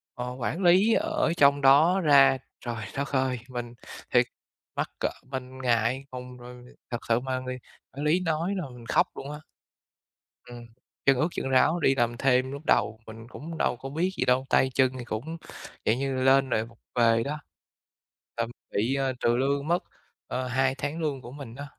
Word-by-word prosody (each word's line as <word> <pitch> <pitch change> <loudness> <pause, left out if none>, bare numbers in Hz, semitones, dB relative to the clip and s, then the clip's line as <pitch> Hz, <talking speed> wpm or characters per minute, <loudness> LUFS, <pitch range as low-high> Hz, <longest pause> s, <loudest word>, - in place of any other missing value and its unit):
ờ, 125 0 -4
quản 165 +10 -2
lý 190 +6 +5
ở - - +1
trong 140 0 +5
đó 155 +8 +6
ra 135 -3 +6 0.3
trời 115 -3 -4
đất 140 +1 -3
ơi, 130 -2 0
mình 120 -1 -5 0.4
thiệt - - +5 0.5
mắc - - -1
cỡ - - +1 0.2
mình 130 0 -6
ngại 120 +2 +1
ngùng 125 0 -8
rồi 125 0 -11 0.3
thật 120 - -1
sự 115 +1 +4
mà 130 0 -2
người 130 0 -5 0.4
quản 145 +3 -4
lý 165 +4 +3
nói 170 +3 -1
là 175 - -3
mình 120 -2 -12
khóc - - +3
luôn 140 +2 -7
á. 150 - -7 1.1
Ừm, 120 -1 -10 0.4
chân 135 -2 +5
ướt 155 - +2
chân 135 - -3
ráo 160 +6 +4
đi 135 -3 +3
làm 120 -1 0
thêm 130 0 +2
lúc 140 +1 -6
đầu 110 0 +2
mình 115 +1 -10
cũng 160 +5 -8
đâu 120 - 0
có 135 - -7
biết 165 +6 0
gì - - +1
đâu, 130 +1 +2
tay 130 - +4
chân 130 -1 +4
thì - - -5
cũng, 140 +10 -5 0.5
dạng 115 +4 +2
như, 135 -1 -1
lên 135 0 +4
rồi 110 +1 +1
vụng 115 -1 -17 0.2
về 115 -1 +4
đó. 150 +2 -4 1.0
Ờm, 115 0 -2 0.2
bị, 115 +7 0
à, 135 -1 0
trừ 120 0 +2
lương 140 +3 0
mất, 175 +1 +2 0.4
ờ, 130 0 -3
2 130 +1 +1
tháng 145 +5 -4
lương 145 -4 -2
của 120 - -10
mình 135 -5 -9
đó. 145 +2 -7
130 Hz, 195 wpm, -27 LUFS, 120-145 Hz, 1.1 s, đó